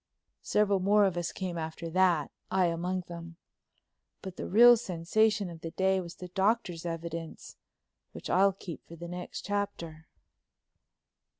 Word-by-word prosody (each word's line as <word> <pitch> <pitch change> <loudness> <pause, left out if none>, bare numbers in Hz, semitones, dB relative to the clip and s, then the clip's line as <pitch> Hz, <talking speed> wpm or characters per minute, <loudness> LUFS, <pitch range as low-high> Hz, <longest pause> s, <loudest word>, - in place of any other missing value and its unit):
Several 205 -2 +2
more 205 +2 +4
of 190 -3 0
us 175 -1 -2
came 180 -3 -4
after 160 +1 -5
that, 175 -4 +2 0.2
I 190 -1 +2
among 175 +2 -1
them. 170 -1 -9 0.9
But 190 -2 -7
the - - -5
real 240 +5 +8
sensation 210 +1 +1
of 165 -2 -10
the 165 - -5
day 190 +2 +1
was 170 -1 -9
the 180 - -9
Doctor's 190 -3 0
evidence, 165 -1 -6 0.6
which - - -8
I'll 195 +2 +4
keep 180 -3 -9
for 170 - -10
the 170 +1 -8
next 180 +1 -7
chapter. 175 -6 -4
180 Hz, 145 wpm, -30 LUFS, 170-195 Hz, 0.9 s, real